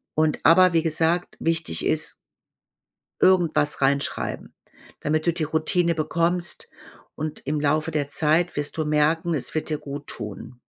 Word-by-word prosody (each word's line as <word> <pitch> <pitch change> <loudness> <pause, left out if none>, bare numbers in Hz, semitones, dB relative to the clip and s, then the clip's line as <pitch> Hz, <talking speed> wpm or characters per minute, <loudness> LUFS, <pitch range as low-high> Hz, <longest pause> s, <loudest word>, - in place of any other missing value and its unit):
Und 155 -1 +1
aber 180 +2 +6
wie 165 - +4
gesagt, 165 +2 0
wichtig 165 - -1
ist - - 0 1.0
irgendwas 165 -6 +3
reinschreiben, 140 +1 -1 0.5
damit 155 +2 -1
du 170 - +3
die 160 - -2
Routine 165 +3 +1
bekommst. 170 +2 -1 0.5
Und 155 0 -6
im 150 +2 -1
Laufe 155 +2 +1
der 150 -3 -1
Zeit 160 +4 +1
wirst 145 +1 -3
du 155 - 0
merken, 155 +3 +1
es 130 -4 -4
wird 155 - -2
dir 155 - -1
guttun. 125 -5 -8
155 Hz, 140 wpm, -24 LUFS, 145-165 Hz, 1.0 s, aber